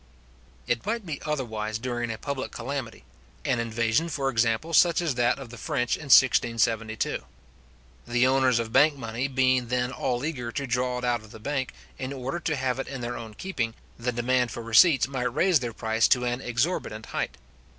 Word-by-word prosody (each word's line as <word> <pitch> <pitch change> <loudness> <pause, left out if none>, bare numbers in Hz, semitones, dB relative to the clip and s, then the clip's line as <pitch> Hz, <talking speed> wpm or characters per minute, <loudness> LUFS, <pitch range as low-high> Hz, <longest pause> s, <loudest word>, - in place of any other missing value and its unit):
It 120 -1 -1
might 220 +1 -2
be 155 -5 -5
otherwise 110 -7 -2
during 120 0 -3
a 110 - -5
public 140 +1 -4
calamity; 130 -1 -5 0.4
an 125 - +1
invasion, 115 +7 0
for 135 -3 -1
example, 115 +7 0
such 170 +1 +5
as 170 -5 0
that 120 0 +2
of 135 -4 -9
the 120 - -10
French 125 +3 0
in 155 - -9
1672. 115 -4 +3 0.8
The 120 +1 +3
owners 130 -2 +3
of 115 -1 -2
bank 145 +2 +5
money 115 +1 -3
being 130 -2 +2
then 125 +1 0
all 125 0 -2
eager 125 -7 -3
to 140 - -2
draw 125 0 0
it 125 - -5
out 120 -2 +1
of 110 - -15
the 110 - -11
bank, 135 +1 -2 0.3
in 130 +1 -4
order 135 +4 -4
to 160 -2 -1
have 130 -1 -1
it 135 - -3
in 135 -2 -6
their 120 0 -3
own 110 -2 -8
keeping, 120 - -3 0.2
the 125 +1 -1
demand 125 +1 +1
for 115 - -6
receipts 135 +7 +5
might 125 -2 -2
raise 175 0 +4
their 120 -2 -3
price 110 0 +1
to 125 -2 +3
an 120 +1 -1
exorbitant 120 -3 -1
height. - - -3
125 Hz, 190 wpm, -26 LUFS, 115-135 Hz, 0.8 s, such